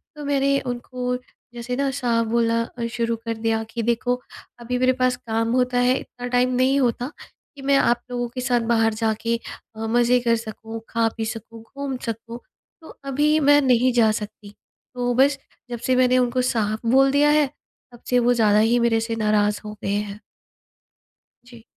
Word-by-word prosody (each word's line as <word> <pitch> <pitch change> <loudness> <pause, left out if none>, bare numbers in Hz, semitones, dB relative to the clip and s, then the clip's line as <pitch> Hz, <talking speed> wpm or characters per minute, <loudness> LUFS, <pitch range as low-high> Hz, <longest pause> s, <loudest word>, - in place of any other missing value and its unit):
तो 295 -1 -8
मैंने 275 -1 +2
उनको 250 0 -4 0.4
जैसे 240 +1 -4
ना 275 +1 0
साफ 240 -4 0
बोलना 230 0 +1 0.2
अ, 235 - -1
शुरू 230 0 -2
कर 230 - -1
दिया 225 0 0
कि 235 - -3
देखो, 240 +2 +1 0.4
अभी 245 +1 -3
मेरे 255 0 +3
पास 255 0 +3
काम 225 0 -2
होता 250 0 +1
है 250 +1 +3
इतना 245 0 -8
टाइम 250 0 +2
नहीं 260 +2 +3
होता 245 +1 0 0.4
कि 280 - -11
मैं 275 0 +3
आप 240 -2 +2
लोगों 245 0 -2
के 250 - -4
साथ 250 -1 +1
बाहर 225 -1 +2
जाके 225 +1 -1 0.4
अ, - - -11
मज़े 240 +2 +3
कर 235 -1 +2
सकूँ, 225 0 -7
खा 230 -1 +1
पी 225 - -2
सकूँ, 225 0 -7
घूम 280 -2 -4
सकूँ, 230 +1 -6 0.4
तो 320 - -13
अभी 295 +3 +2
मैं 290 0 +5
नहीं 255 -1 +3
जा 225 -3 +4
सकती। 210 -1 -7 0.4
तो 245 0 0
बस, 275 +2 +4 0.3
जब 240 -1 -5
से 255 +2 0
मैंने 255 0 +4
उनको 250 0 +1
साफ 220 -4 0
बोल 270 +1 +5
दिया 290 +1 +4
है 300 -1 +3 0.4
तब 240 - -16
से 250 - +4
वो 245 0 +3
ज़्यादा 215 -3 +3
ही 230 +3 +3
मेरे 235 -1 +2
से 225 0 -3
नाराज़ 210 -1 +1
हो 210 - -6
गए 195 - -1
हैं। 205 0 -3 1.3
जी। 240 -2 -15
240 Hz, 185 wpm, -22 LUFS, 225-255 Hz, 1.3 s, मैं